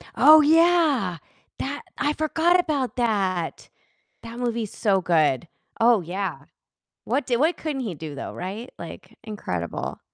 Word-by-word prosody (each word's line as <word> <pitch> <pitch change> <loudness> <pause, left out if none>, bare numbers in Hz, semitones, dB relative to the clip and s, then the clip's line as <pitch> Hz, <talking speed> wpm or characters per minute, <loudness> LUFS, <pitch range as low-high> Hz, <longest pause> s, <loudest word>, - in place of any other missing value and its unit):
Oh 310 0 +8
yeah, 310 - +3 0.4
that 285 +2 -4 0.2
I 295 - 0
forgot 325 +4 +2
about 285 -7 -1
that. 195 -8 -1 0.5
That 230 +1 -8
movie's 235 -3 -3
so 195 -3 +2
good, 160 -3 +2 0.3
oh 230 -2 +5
yeah. 190 +3 -4 0.6
What 275 - -1
d 245 - +1
what 315 +8 +2
couldn't 300 -4 -4
he 220 -8 -4
do, 155 -1 -8
though, 140 - -6
right? 205 +7 -6
Like, 185 +5 -10
incredible. 90 - -5
230 Hz, 135 wpm, -24 LUFS, 185-290 Hz, 0.6 s, Oh